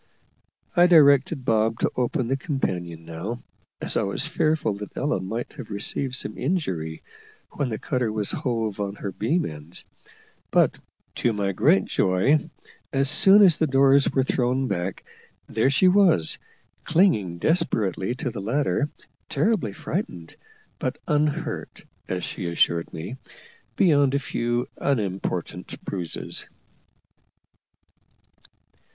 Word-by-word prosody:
I 175 0 +6
directed 140 -5 +5
Bob 110 -1 +2
to - - +2
open 125 +1 0
the 135 - +1
companion 90 - -3
now, 85 +9 -6 0.4
as - - -3
I - - +2
was 100 +8 -1
fearful 155 -7 +1
that 105 - -9
Ella 140 -7 0
might 110 +6 -5
have - - -9
received 125 +6 -1
some - - -4
injury 95 - -2 0.5
when 140 -4 -2
the 110 - -3
cutter 125 -3 -1
was 105 -2 -1
hove 115 -5 -2
on 100 0 -3
her 100 - -5
beam 150 - 0
ends; 75 +2 -8 0.6
but, - - +3 0.4
to 120 - +1
my 100 -2 -1
great 90 - +3
joy, 125 - +2 0.4
as 135 +1 +1
soon 195 +6 +7
as 180 -5 +5
the 160 - +3
doors 135 0 +4
were 135 - +2
thrown 130 +1 0
back, 95 -2 -3 0.4
there 115 +4 +1
she 145 +7 +4
was, 180 - +3 0.4
clinging 155 - +2
desperately 110 - 0
to 125 0 -3
the 110 -4 -6
ladder, 145 +6 0 0.4
terribly 205 - +1
frightened, 85 -3 -5 0.4
but - - -2
unhurt, 150 0 -1 0.2
as 90 -1 -3
she 90 - -5
assured 85 0 +1
me, 90 +11 -6 0.6
beyond 145 -6 +4
a - - +4
few 120 -3 -1
unimportant 105 -9 -2
bruises. 90 -4 -5
120 Hz, 130 wpm, -24 LUFS, 95-145 Hz, 0.6 s, soon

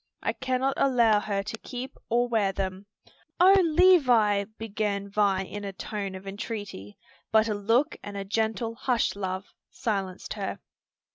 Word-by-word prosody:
I - - 0
cannot 260 +1 0
allow 235 -6 +4
her 200 -1 -2
to 215 +2 -5
keep 255 0 -7
or 240 +1 +2
wear 220 -5 +1
them." 190 +1 -4 0.5
"O 370 +2 +8
Levis!" 260 - +4
began 205 -2 -2
Vi 200 -2 +1
in 205 +2 -7
a 200 -1 -5
tone 195 0 -5
of 190 +1 -9
entreaty; 200 - -6 0.3
but 220 0 +4
a 215 - 0
look 225 +9 +1
and 205 -1 -7
a 195 - -4
gentle 220 +2 -1
"Hush, 240 -2 0
love!" 190 -1 -4 0.2
silenced 195 -4 -3
her. - - -4
210 Hz, 150 wpm, -27 LUFS, 195-240 Hz, 0.5 s, O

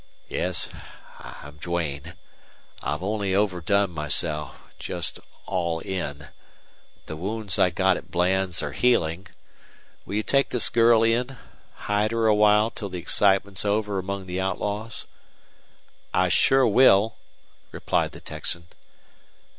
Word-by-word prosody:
"Yes, 90 -5 -1 0.5
I'm 75 +1 -11
Duane. 85 -1 -4 0.7
I've - - -3
only 100 -1 -1
overdone 100 0 +1
myself 75 -1 -1 0.2
just - - -2 0.3
all 85 -2 -1
in. 75 -6 -5 0.8
The 80 - -6
wounds 100 +3 -2
I 90 - +5
got 95 +1 +2
at - - -11
Bland's 90 0 0
are 75 - -3
healing. 90 - +1 0.8
Will 100 - -6
you 105 - 0
take 140 +3 +2
this 125 - +1
girl 115 -1 +5
in 120 +3 0 0.5
hide 105 +1 +1
her 115 -1 +1
awhile 105 +1 +4
till 100 -4 -6
the 90 - -6
excitement's 95 +2 +2
over 105 -1 0
among 95 +1 -5
the 90 +1 -3
outlaws?" 105 +4 -3 1.1
"I 90 0 +3
shore 135 +8 +4
will," 110 -2 +4 0.5
replied - - -1
the - - -11
Texan. 85 0 -3
95 Hz, 125 wpm, -25 LUFS, 85-105 Hz, 1.1 s, I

